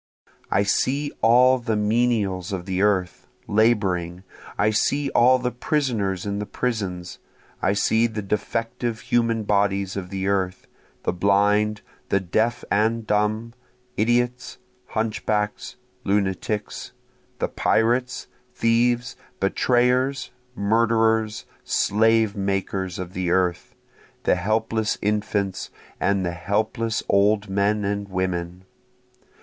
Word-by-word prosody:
I 100 - +2
see 140 +8 0
all 125 +3 +5
the 115 -2 -1
menials 105 -3 0
of 90 -3 -4
the 95 -1 -1
earth, 95 -3 0 0.2
laboring, 95 -5 +1 0.3
I 105 +1 +3
see 140 +6 +1
all 125 +2 +5
the 125 -1 -2
prisoners 115 - -1
in 100 0 -2
the 105 - -4
prisons, 95 -8 -3 0.4
I 95 - +2
see 110 +3 +2
the 110 -2 -5
defective 115 +3 -2
human 115 -2 +1
bodies 100 -2 +1
of 95 -2 -5
the 95 0 -3
earth, 95 -2 -1 0.4
The - - 0
blind, 105 +3 +2 0.3
the 100 - +3
deaf 110 +6 0
and 110 +2 +1
dumb, 110 +2 0 0.4
idiots, 120 +3 0 0.3
hunchbacks, 105 -1 -2 0.3
lunatics, 100 +1 -2 0.4
The - - -1
pirates, 120 +3 +1 0.3
thieves, 120 +1 +1 0.2
betrayers, 125 +6 +1 0.2
murderers, 110 0 +1 0.2
slave 110 0 +2
makers 95 -2 -2
of 90 0 -6
the 90 -1 -2
earth, 90 -1 0 0.5
The - - +3
helpless 110 +3 0
infants, 100 -2 -1 0.3
and 100 -2 +1
the 85 - -1
helpless 110 +5 -1
old 100 +1 +2
men 100 +1 +1
and 100 0 -2
women. 90 -1 -3
105 Hz, 110 wpm, -23 LUFS, 95-115 Hz, 0.5 s, all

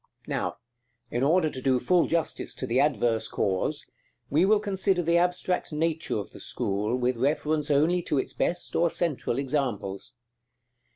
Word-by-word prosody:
§ - - -54 0.2
IV. - - -28
Now, - - -2 0.5
in 120 - -1
order 160 +4 +3
to 130 - -7
do 130 -1 +2
full 170 +7 +3
justice 165 -1 -2
to - - -4
the 125 +1 +1
adverse 120 -6 +2
cause, 95 -2 -1 0.5
we 155 +6 +4
will 210 +1 +4
consider 190 -3 0
the 170 +1 +3
abstract 180 0 0
nature 160 -1 -1
of 100 - -5
the - - -12
school 105 +4 -1
with 125 0 0
reference 150 +3 0
only 155 +5 +3
to 150 - -1
its - - -2
best 175 +1 -1
or 170 0 +3
central 155 -8 -1
examples. 125 -7 -2
150 Hz, 170 wpm, -27 LUFS, 125-170 Hz, 0.5 s, we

